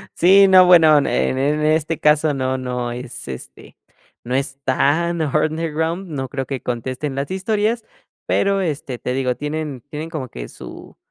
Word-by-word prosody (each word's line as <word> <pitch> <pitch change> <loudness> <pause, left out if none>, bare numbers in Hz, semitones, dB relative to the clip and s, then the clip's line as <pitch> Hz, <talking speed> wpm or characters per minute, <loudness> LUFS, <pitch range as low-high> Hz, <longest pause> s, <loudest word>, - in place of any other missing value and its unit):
Sí, 195 +3 +6
no, 185 -1 +7
bueno, 165 -4 +7
en 145 - +2
en 130 - 0
en 145 +3 0
este 155 +1 +1
caso 150 0 +3
no 130 -1 -1
no 125 -1 -3
es 125 0 -8
este, 65 -2 -10 0.5
no 125 +2 -3
es 135 0 -2
tan 160 +6 +1
underground, 160 +4 -1
no 135 -4 -4
creo 135 +1 -4
que 135 -1 -5
contesten 130 +4 -4
las 140 +1 -3
historias, 215 +4 -1 0.4
pero, 200 0 +1
este, 145 -7 -3
te 125 - -3
digo, 130 -1 -1
tienen 150 -2 -4
tienen 155 +2 -6
como 150 -6 -5
que - - -8
su - - -11
150 Hz, 170 wpm, -20 LUFS, 130-165 Hz, 0.5 s, no